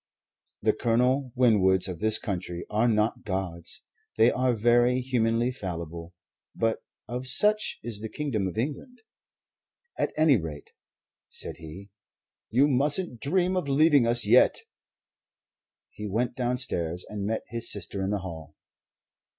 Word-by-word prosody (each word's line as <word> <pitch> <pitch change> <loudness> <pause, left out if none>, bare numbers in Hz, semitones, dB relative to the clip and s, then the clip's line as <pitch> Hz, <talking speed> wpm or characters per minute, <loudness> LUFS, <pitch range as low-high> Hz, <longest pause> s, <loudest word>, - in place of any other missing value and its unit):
The - - +3
Colonel 125 +3 +1
Winwoods 95 -7 +3
of 90 -3 -6
this 110 +2 +2
country 90 -4 -4
are 110 +3 +2
not 110 -1 +1
gods; 95 -4 -4 0.3
they 115 +2 +6
are 125 0 +1
very 120 +3 +3
humanly 120 -1 +1
fallible; 85 -5 -6 0.4
but 115 -1 0 0.3
of 125 +2 -4
such 210 +11 +2
is 115 -4 -4
the 110 +1 -6
Kingdom 115 -10 -2
of 90 - -6
England. 155 - -4 1.0
"At - - 0
any 155 -4 +5
rate," 80 -5 -7 0.6
said - - -6
he, 85 +5 -11 0.6
"you 130 +6 +4
mustn't 145 0 +1
dream 185 +5 +1
of 180 -6 -1
leaving 145 -3 +4
us 120 0 +1
yet." - - +5 1.3
He 105 - -7
went 120 +4 -1
downstairs 120 -9 -1
and 105 -1 -5
met 110 +1 -2
his 115 0 -2
sister 100 -1 -3
in 95 - -1
the 105 -1 -1
hall. 80 -4 -8
115 Hz, 135 wpm, -27 LUFS, 95-130 Hz, 1.3 s, they